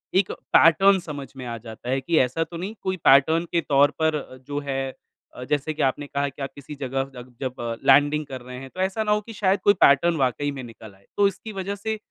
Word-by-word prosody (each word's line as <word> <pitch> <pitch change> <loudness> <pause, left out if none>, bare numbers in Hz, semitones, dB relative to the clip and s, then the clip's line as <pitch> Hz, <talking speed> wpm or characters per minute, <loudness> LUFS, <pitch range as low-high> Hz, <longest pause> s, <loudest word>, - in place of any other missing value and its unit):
एक 190 0 +3 0.2
पैटर्न 190 +4 +6
समझ 145 -5 -7
में 130 - -7
आ 120 -1 -5
जाता 115 +1 -9
है 135 +1 0
कि 160 +5 0
ऐसा 130 +6 +1
तो 170 +1 -9
नहीं, 190 +5 -5
कोई 190 0 -2
पैटर्न 160 +5 +5
के 170 - +2
तौर 145 -1 +3
पर 155 -4 -1
जो 145 0 -2
है 135 -1 -2 0.4
अ, 125 - -7
जैसे 150 +3 -1
कि 155 - -5
आपने 140 +2 0
कहा 140 0 -1
कि 135 +1 -13
आप 135 - -3
किसी 140 +1 -10
जगह 135 -1 -2
तक 125 0 -10
जब 130 -2 -2 0.3
लैंडिंग 145 +1 +4
कर 130 -2 -8
रहे 125 +1 -9
हैं, 135 0 -9
तो 185 - -13
ऐसा 195 +4 0
ना 210 - 0
हो 210 0 +2
कि 225 +2 -11
शायद 200 -2 +1
कोई 205 - +6
पैटर्न 155 +5 +5
वाक़ई 135 +1 0
में - - -5
निकल 110 -3 -12
आए। 95 0 -26
तो 200 - +5
इसकी 200 +3 -6
वजह 195 +1 -4
से 220 +2 -3
145 Hz, 245 wpm, -24 LUFS, 130-185 Hz, 0.4 s, पैटर्न